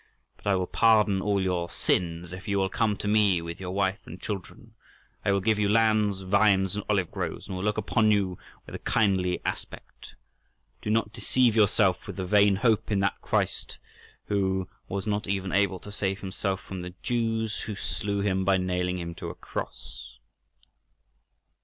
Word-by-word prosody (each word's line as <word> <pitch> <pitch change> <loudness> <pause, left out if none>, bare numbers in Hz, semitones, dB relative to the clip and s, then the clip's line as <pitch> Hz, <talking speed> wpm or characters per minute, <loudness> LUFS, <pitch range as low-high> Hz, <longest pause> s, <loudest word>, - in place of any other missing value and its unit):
But - - -11
I 100 - +4
will 90 -1 0
pardon 105 -2 +3
all 100 0 +1
your 90 -2 -1
sins 85 0 -1
if 95 +1 -9
you 100 -1 +1
will 95 -1 +1
come 105 -1 0
to - - -4
me 105 -4 +4
with 85 0 -6
your 95 -1 -5
wife 95 +2 0
and 90 - -9
children; 100 -4 -7 0.5
I - - +2
will 100 0 +2
give 110 +2 +2
you 105 -1 +2
lands, 110 -3 +3
vines, 95 0 +3
and 105 - -3
olive 95 -5 +1
groves, - - -4
and 95 - -5
will 95 - -4
look 105 0 0
upon 110 +1 +2
you 100 -4 +1 0.3
with - - -11
a - - -5
kindly 95 -4 +1
aspect. - - -6 0.7
Do - - -4
not 110 -1 +1
deceive 125 -4 +2
yourself 105 -3 +3
with - - -6
the 95 - -3
vain 100 +1 +5
hope 110 0 +2
in 100 - +2
that 100 - 0
Christ, - - -1 0.5
who 95 -2 0 0.2
was 100 +1 -3
not 105 0 -1
even 95 -1 -1
able 100 -1 +2
to 105 - -10
save 95 -1 -2
himself 95 0 -3
from 95 -3 -7
the 90 0 -8
Jews, 115 -2 -1
who 105 - -5
slew 100 0 -2
him 95 -1 +1
by 95 0 +3
nailing 90 0 -1
him 85 -1 -5
to - - -6
a - - -7
cross." - - -7
100 Hz, 185 wpm, -27 LUFS, 95-105 Hz, 0.7 s, vain